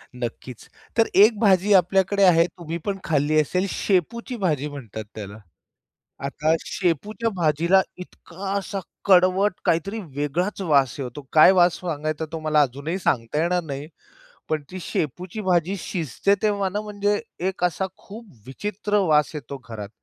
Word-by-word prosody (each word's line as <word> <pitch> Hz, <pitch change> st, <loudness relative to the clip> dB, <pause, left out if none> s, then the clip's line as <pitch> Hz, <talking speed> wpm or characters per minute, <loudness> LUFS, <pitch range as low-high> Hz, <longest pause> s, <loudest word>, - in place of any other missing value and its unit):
नक्कीच. 120 Hz, 0 st, -7 dB, 0.3 s
तर 225 Hz, -, +4 dB
एक 215 Hz, +1 st, +6 dB
भाजी 200 Hz, -1 st, +4 dB
आपल्याकडे 195 Hz, +2 st, +3 dB
आहे 170 Hz, -2 st, +6 dB
तुम्ही 170 Hz, -1 st, -6 dB
पण 200 Hz, -1 st, -1 dB
खाल्ली 155 Hz, 0 st, +2 dB
असेल, 180 Hz, +6 st, -1 dB
शेपूची 225 Hz, -, -1 dB
भाजी 150 Hz, -7 st, 0 dB
म्हणतात 115 Hz, -7 st, -7 dB
त्याला. 105 Hz, 0 st, -7 dB, 0.9 s
आता 155 Hz, +3 st, 0 dB
शेपूच्या 205 Hz, +6 st, -1 dB
भाजीला 170 Hz, +3 st, +3 dB, 0.2 s
इतका 190 Hz, +1 st, -8 dB
असा 200 Hz, 0 st, -4 dB, 0.3 s
कडवट 185 Hz, +1 st, +4 dB
काहीतरी 195 Hz, +7 st, 0 dB, 0.2 s
वेगळाच 175 Hz, +8 st, -2 dB
वास 140 Hz, -8 st, +2 dB
येतो, 130 Hz, +1 st, -5 dB
काय 155 Hz, +4 st, +8 dB
वास 175 Hz, -2 st, +4 dB
सांगायचा 155 Hz, -2 st, -3 dB
तो? 165 Hz, -, -4 dB
मला 155 Hz, -1 st, +3 dB
अजूनही 145 Hz, +6 st, -2 dB
सांगता 130 Hz, -3 st, 0 dB
येणार 180 Hz, +2 st, +1 dB
नाही, 145 Hz, -1 st, -6 dB, 0.6 s
पण 155 Hz, -1 st, 0 dB
ती 185 Hz, -, -6 dB
शेपूची 180 Hz, -, -3 dB
भाजी 180 Hz, +1 st, +2 dB
शिजते 175 Hz, +2 st, 0 dB
तेव्हा 205 Hz, -2 st, +1 dB
ना 205 Hz, +3 st, -3 dB
म्हणजे 205 Hz, 0 st, -1 dB, 0.3 s
एक 190 Hz, -2 st, -4 dB
असा 180 Hz, +2 st, +1 dB
खूप 225 Hz, +4 st, -11 dB, 0.2 s
विचित्र 205 Hz, +9 st, -2 dB
वास 150 Hz, -1 st, +3 dB
येतो 140 Hz, -1 st, -6 dB
घरात 105 Hz, -3 st, -6 dB
175 Hz, 145 wpm, -23 LUFS, 150-195 Hz, 0.9 s, काय